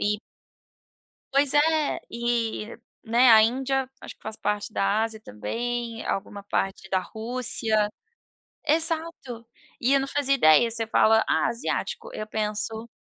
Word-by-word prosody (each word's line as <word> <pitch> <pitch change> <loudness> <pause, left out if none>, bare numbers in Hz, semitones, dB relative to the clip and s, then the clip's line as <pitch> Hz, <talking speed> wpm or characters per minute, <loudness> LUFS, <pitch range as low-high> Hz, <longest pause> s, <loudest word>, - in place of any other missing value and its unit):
E 210 0 +1 1.1
Pois 275 0 +3
é. 310 0 +3
E 235 -2 -2 0.3
né, 235 +2 +5
a 220 -1 +9
Índia, 265 +3 0
acho - - -8
que - - -42
faz 220 0 -6
parte 210 +1 -2
da 200 +1 +1
Ásia 225 -1 -3
também, 230 - -4
alguma 200 +1 -3
parte 195 -1 -2
da 190 - +3
Rússia. 220 0 -1 0.8
Exato. 320 -6 -1 0.3
E 255 +3 +2
eu 275 - +4
não 270 - -3
fazia 275 -1 +1
ideia, 230 - +5
você 230 0 -2
fala: 220 0 +4
"Ah, - - +2
asiático", 455 - -3
eu 215 - -5
penso 215 +1 -3
230 Hz, 140 wpm, -25 LUFS, 215-260 Hz, 1.1 s, a